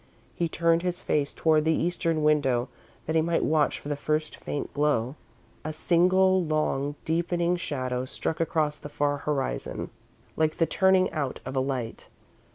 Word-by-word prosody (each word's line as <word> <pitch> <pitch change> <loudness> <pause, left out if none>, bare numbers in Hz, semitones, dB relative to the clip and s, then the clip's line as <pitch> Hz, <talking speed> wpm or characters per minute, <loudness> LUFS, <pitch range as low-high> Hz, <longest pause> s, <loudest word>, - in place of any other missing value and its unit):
He 170 -1 -1
turned 165 +1 +2
his 180 0 -2
face 145 -5 0
toward 155 -1 +2
the 160 0 +2
Eastern 165 -2 0
window, 135 -5 +2 0.4
that 160 - -2
he 160 - +5
might 165 +1 +1
watch 155 -1 +2
for - - -10
the 145 - -1
first 155 +2 -1
faint 145 - -5
glow. 140 -4 +1 0.5
A 155 - -3
single 185 +4 +3
long, 150 -2 0
deepening 170 +1 +1
shadow 130 -6 -3
struck 155 +4 -4
across 155 -2 0
the 145 - -8
far 145 0 0
horizon 140 - -3 0.4
like 155 -1 +1
the 165 - +3
turning 190 +1 +3
out 145 -5 -3
of - - -5
a - - +2
light. 130 -4 -3
155 Hz, 165 wpm, -27 LUFS, 145-170 Hz, 0.5 s, he